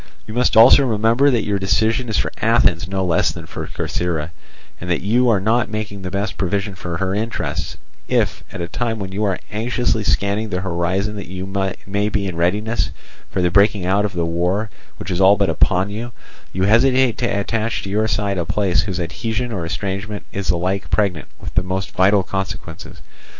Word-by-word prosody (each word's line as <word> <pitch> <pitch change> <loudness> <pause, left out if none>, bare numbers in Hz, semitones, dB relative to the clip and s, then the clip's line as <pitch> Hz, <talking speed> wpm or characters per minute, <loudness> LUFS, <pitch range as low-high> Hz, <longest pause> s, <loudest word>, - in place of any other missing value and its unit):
You 110 - -8
must 125 -1 +2
also 125 +5 +8
remember 115 +3 +3
that 120 -5 +1
your 100 -1 0
decision 110 +6 +1
is 110 - 0
for - - 0
Athens 105 -6 +3
no 95 -1 -1
less 85 -2 +2
than - - -9
Corcyra, 85 -3 -3 0.5
and 90 - -6
that 90 - +1
you 120 +5 +3
are 105 -4 +3
not 110 +4 +1
making 105 -2 -5
the 90 - -4
best 100 +3 -3
provision 100 +2 -1
for 90 -2 -5
her 95 +1 -1
interests, 110 +3 -3 0.3
if - - 0
at - - -6
a 85 - -3
time 115 +5 -2
when 95 -2 -5
you 100 +3 -2
are 95 -2 0
anxiously 115 0 0
scanning 100 +2 0
the 90 -2 -2
horizon 95 +3 -1
that 100 -5 -6
you 95 +1 -5 0.4
may 100 +2 0
be 105 -1 -1
in 90 -3 -3
readiness 95 +3 0 0.4
for 90 - -1
the 90 - +2
breaking 100 0 +3
out 95 +3 +2
of 105 -1 -2
the 85 -1 -1
war 90 +6 -1 0.3
which 90 - -6
is 90 +1 0
all 100 +2 +6
but 100 0 +2
upon 95 +1 +2
you, 115 +3 -5 0.4
you 95 - -2
hesitate 125 +4 +4
to 120 - +1
attach 115 +2 -1
to 95 - -5
your 110 +2 +1
side 100 -3 0
a - - +1
place 95 +2 +1
whose 95 -2 -3
adhesion 110 +8 -3
or 90 -6 -3
estrangement 100 +3 -4
is 100 -1 -4
alike 90 +1 0
pregnant 95 -8 0
with - - -7
the 90 - +3
most 95 0 -3
vital 95 +1 +3
consequences. 95 -4 -6
100 Hz, 195 wpm, -20 LUFS, 90-110 Hz, 0.5 s, also